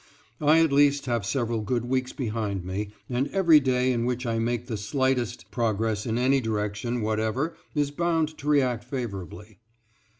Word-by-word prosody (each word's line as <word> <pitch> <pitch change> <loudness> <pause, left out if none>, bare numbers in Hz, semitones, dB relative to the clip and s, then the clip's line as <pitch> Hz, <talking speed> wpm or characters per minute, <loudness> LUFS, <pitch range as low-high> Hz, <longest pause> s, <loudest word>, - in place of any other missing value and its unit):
I 155 +2 +5
at 160 - +1
least 140 0 +4
have 120 -5 -1
several 115 -3 -1
good 120 +3 -1
weeks 130 +1 -1
behind 105 -6 -3
me, 100 +3 -3 0.2
and 125 +2 0
every 170 -5 +5
day 130 -1 +1
in 120 -2 0
which 125 +1 -2
I 115 -1 0
make 120 +1 -1
the 120 -3 -4
slightest 125 +2 -1
progress 110 -2 -1
in 115 0 0
any 130 +2 +3
direction 110 +2 -2
whatever 110 +8 -1 0.2
is 145 -1 +1
bound 160 0 0
to 145 - -8
react 130 -6 +2
favorably. 105 - -6
120 Hz, 165 wpm, -26 LUFS, 110-135 Hz, 0.2 s, I